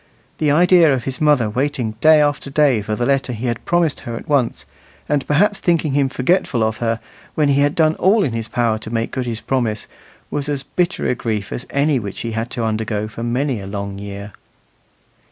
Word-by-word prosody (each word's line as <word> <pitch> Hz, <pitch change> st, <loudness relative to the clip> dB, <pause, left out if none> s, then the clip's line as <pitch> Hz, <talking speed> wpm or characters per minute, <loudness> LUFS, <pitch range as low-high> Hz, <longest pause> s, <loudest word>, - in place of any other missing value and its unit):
The 155 Hz, -, +2 dB
idea 170 Hz, +1 st, +5 dB
of 130 Hz, -3 st, 0 dB
his 130 Hz, +2 st, -5 dB
mother 145 Hz, -7 st, +4 dB
waiting 125 Hz, +1 st, -1 dB
day 155 Hz, -1 st, +6 dB
after 145 Hz, -1 st, -1 dB
day 140 Hz, -5 st, +3 dB
for 105 Hz, +1 st, -3 dB
the 120 Hz, -, -1 dB
letter 135 Hz, -2 st, +1 dB
he 115 Hz, +2 st, -5 dB
had 120 Hz, -2 st, -2 dB
promised 175 Hz, -3 st, +1 dB
her 115 Hz, -, -6 dB
at -, -, -8 dB
once, 140 Hz, -5 st, 0 dB, 0.4 s
and 145 Hz, -2 st, 0 dB
perhaps 200 Hz, +7 st, +2 dB
thinking 165 Hz, -6 st, +1 dB
him 140 Hz, -1 st, +2 dB
forgetful 130 Hz, -4 st, +1 dB
of 110 Hz, 0 st, -1 dB
her, 115 Hz, -1 st, -1 dB, 0.4 s
when 150 Hz, -2 st, +2 dB
he 140 Hz, 0 st, +3 dB
had 145 Hz, +1 st, +2 dB
done 155 Hz, -1 st, +3 dB
all 200 Hz, +3 st, +3 dB
in 130 Hz, -, -1 dB
his 115 Hz, -1 st, -3 dB
power 115 Hz, -3 st, 0 dB
to 110 Hz, -, -8 dB
make 115 Hz, 0 st, -2 dB
good 130 Hz, -2 st, -3 dB
his 115 Hz, -1 st, -4 dB
promise, 115 Hz, -5 st, -1 dB, 0.5 s
was 145 Hz, 0 st, -2 dB
as 140 Hz, -2 st, -2 dB
bitter 175 Hz, +5 st, -1 dB
a -, -, +2 dB
grief 110 Hz, -5 st, -3 dB
as 125 Hz, -, -6 dB
any 140 Hz, -1 st, +1 dB
which 100 Hz, -3 st, -6 dB
he 115 Hz, -, -3 dB
had 115 Hz, +2 st, -3 dB
to 120 Hz, -2 st, -3 dB
undergo 110 Hz, -1 st, -2 dB
for 110 Hz, +2 st, -9 dB
many 120 Hz, 0 st, -1 dB
a 95 Hz, -, -8 dB
long 100 Hz, 0 st, -5 dB
year. 100 Hz, 0 st, -7 dB
130 Hz, 215 wpm, -19 LUFS, 110-145 Hz, 0.5 s, day